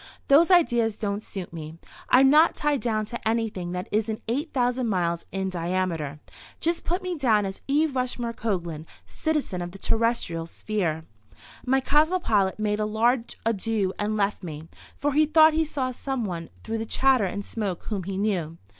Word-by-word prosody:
Those 310 +5 +6
ideas 240 - +3
don't 205 -1 -2
suit 190 -5 -7
me. 160 0 -7 0.3
I'm 265 +1 +6
not 305 +4 +5
tied 295 -3 0
down 215 -3 0
to 235 +1 -5
anything 220 -6 -1
that 180 +2 -4
isn't 215 +1 -1
8,000 250 -1 0
miles 170 -4 -1
in 190 0 -2
diameter. 170 -4 -2 0.4
Just 335 +1 0
put 360 +3 -1
me 365 -1 -2
down 225 -9 +2
as 195 0 -6
E. 290 +3 +3
Rushmore 250 -4 -2
Coglan, 170 -9 -3 0.2
citizen 300 - -2
of 175 0 -5
the - - -9
terrestrial 220 -7 0
sphere." 165 -5 -2 0.6
My 265 +1 +3
cosmopolite 290 - +2
made 210 -1 0
a 215 - +1
large 230 +3 +1
adieu 215 -3 0
and 215 +1 -1
left 200 0 0
me, 160 -3 -7 0.3
for 290 0 0
he 305 +1 +4
thought 315 0 +6
he 320 +1 +2
saw 265 -4 -2
some 260 -1 -3
one 170 -4 -5
through 225 0 -3
the 225 - -4
chatter 260 -4 +3
and 200 +2 -4
smoke 200 -6 -3
whom 205 -4 -3
he 195 0 -4
knew. 180 -6 -1
220 Hz, 170 wpm, -25 LUFS, 185-265 Hz, 0.6 s, Those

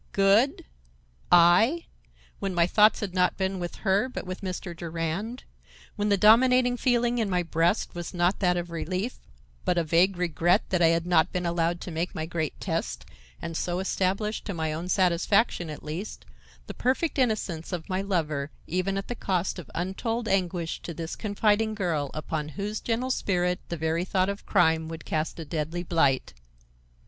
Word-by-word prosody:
Good! 200 +7 +3 0.7
I! 180 - +5 0.5
when 195 -2 -3
my 170 -1 +4
thoughts 210 +4 +4
had 200 -4 -3
not 180 -1 +2
been 190 0 -1
with 175 -1 -5
her, 200 +6 +2
but 255 - -6
with 185 0 -6
Mr. 185 -2 -5
Durand; 170 +8 -4 0.5
when 210 -1 0
the 200 - +4
dominating 245 +4 +5
feeling 240 -1 +1
in 220 -3 0
my 180 -1 +1
breast 165 +4 +1
was 175 -1 -5
not 175 +1 +1
that 180 -2 +2
of 175 -1 -4
relief, 185 +8 -3 0.4
but 180 - +1
a 170 - +3
vague 175 +4 +3
regret 175 +2 +2
that 185 -2 +2
I 165 - +6
had 165 0 +2
not 175 -3 +3
been 180 -1 -2
allowed 170 0 0
to 180 - -6
make 165 +3 -3
my 155 - -2
great 160 -2 -3
test 60 +1 -3 0.4
and 165 -1 -4
so 175 +2 -1
establish, 195 +3 -1
to 200 - -4
my 160 -1 -1
own 170 +3 -5
satisfaction, 185 0 +2
at 150 - -8
least, 165 - -6 0.4
the - - -7
perfect 270 +5 0
innocence 205 -10 -1
of 175 -3 -4
my 185 -1 -1
lover 155 -7 -1 0.2
even 185 +3 -1
at 195 - -4
the - - -3
cost 185 -5 -1
of 170 - -10
untold 225 +6 -2
anguish 180 -4 -1
to 170 - -7
this 165 0 -5
confiding 215 +1 +1
girl 165 -8 -1
upon 155 0 -3
whose 210 +2 -3
gentle 245 +3 -1
spirit 180 -6 0
the 170 - -3
very 160 +2 0
thought 185 +1 +1
of 200 0 -6
crime 160 -4 +3
would 165 0 -8
cast 155 +1 -2
a 165 - -5
deadly 160 +3 -3
blight. 140 - +1
180 Hz, 180 wpm, -27 LUFS, 165-205 Hz, 0.7 s, I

